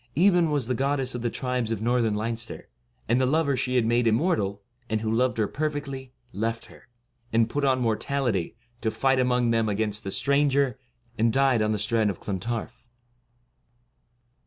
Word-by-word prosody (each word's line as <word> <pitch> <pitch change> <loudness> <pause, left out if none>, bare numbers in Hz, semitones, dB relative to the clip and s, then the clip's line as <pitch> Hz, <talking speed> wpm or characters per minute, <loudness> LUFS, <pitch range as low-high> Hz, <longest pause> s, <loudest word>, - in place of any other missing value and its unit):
Aebhen 175 -2 +4
was 145 -4 0
the 125 - -1
goddess 135 0 0
of 120 - -4
the 120 - 0
tribes 125 -3 -2
of 115 - -1
northern 115 -1 +1
Leinster; 115 +2 -3 0.4
and 120 +3 +2
the 130 - +2
lover 145 0 +2
she 130 0 -1
had 120 -3 +3
made 120 +1 +2
immortal, 110 - +1 0.3
and 110 -1 0
who 110 -1 -1
loved 125 +1 +1
her 110 -2 +1
perfectly, 145 -3 -4 0.2
left 115 +2 -2
her, - - -17 0.4
and 115 0 +2
put 145 - -1
on 130 -2 +3
mortality, 115 -4 -1 0.3
to 110 - +1
fight 135 +3 +1
among 125 -2 +2
them 115 -1 +1
against 105 +1 -1
the 95 - -4
stranger, 140 +1 +2 0.4
and 115 +1 +3
died 135 -2 +3
on 110 0 +1
the 105 - 0
strand 105 +1 +1
of 95 - -4
Clontarf. 115 +4 -5
120 Hz, 175 wpm, -26 LUFS, 110-135 Hz, 0.4 s, Aebhen